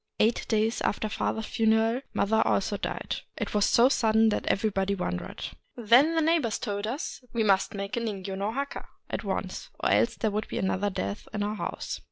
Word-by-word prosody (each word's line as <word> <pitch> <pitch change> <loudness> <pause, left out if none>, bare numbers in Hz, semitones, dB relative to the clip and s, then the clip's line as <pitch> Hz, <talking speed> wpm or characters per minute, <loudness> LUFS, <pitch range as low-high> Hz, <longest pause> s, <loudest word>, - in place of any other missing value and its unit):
Eight 225 +2 +2
days 220 +1 +1
after 215 - 0
father's 220 +1 -2
funeral 225 +3 +2
mother 220 +2 +2
also 200 +1 +1
died. 200 - -3 0.2
It - - -3
was 210 -1 +3
so 235 +2 +6
sudden 225 -4 +4
that 210 - -2
everybody 200 -1 +1
wondered. 90 - -4 0.3
Then 245 +8 +5
the 325 - +3
neighbors 310 -9 +2
told 205 -2 -3
us 265 +8 -4
that 250 - -25
we 230 -2 +1
must 195 -1 +2
make 200 +3 -3
a - - 0
ningyo 200 -4 -4
no 200 +2 -1
Jiaka 280 +4 -4 0.3
at - - -2
once, - - -4
— - - -35
or - - +1
else - - +3
there 220 -3 0
would 210 +1 -2
be - - -4
another 190 +2 0
death 100 - -4
in 205 - 0
our 210 +1 -1
house. - - -4
215 Hz, 205 wpm, -28 LUFS, 200-230 Hz, 0.3 s, so